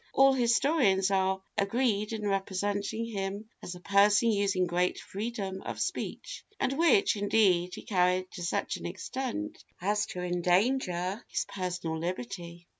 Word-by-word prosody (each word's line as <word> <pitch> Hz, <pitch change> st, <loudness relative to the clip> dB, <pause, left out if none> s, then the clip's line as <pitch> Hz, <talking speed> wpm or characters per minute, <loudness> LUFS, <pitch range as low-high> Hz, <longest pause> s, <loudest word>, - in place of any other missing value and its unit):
All 270 Hz, 0 st, +6 dB
historians 235 Hz, -, +3 dB
are 190 Hz, 0 st, +1 dB, 0.2 s
agreed 210 Hz, 0 st, +1 dB
in 215 Hz, -2 st, -3 dB
representing 200 Hz, +3 st, -1 dB
him 200 Hz, -1 st, -4 dB
as 180 Hz, -, -6 dB
a -, -, -10 dB
person 205 Hz, +4 st, +4 dB
using 200 Hz, -3 st, +1 dB
'great 180 Hz, +1 st, 0 dB
freedom 200 Hz, -2 st, -4 dB
of -, -, -6 dB
speach,' -, -, -4 dB, 0.2 s
and 265 Hz, -, +1 dB
which, 340 Hz, -, +4 dB
indeed, 195 Hz, -4 st, +2 dB
he -, -, -9 dB
carried 185 Hz, -1 st, +1 dB
to 175 Hz, -, -8 dB
such 175 Hz, -, -1 dB
an -, -, -5 dB
extent 300 Hz, +4 st, -5 dB, 0.2 s
as 210 Hz, +3 st, 0 dB
to 180 Hz, -, -5 dB
endanger 180 Hz, +2 st, +1 dB
his -, -, -1 dB
personal 175 Hz, -4 st, -3 dB
liberty. 170 Hz, +1 st, -5 dB
200 Hz, 140 wpm, -29 LUFS, 180-225 Hz, 0.2 s, All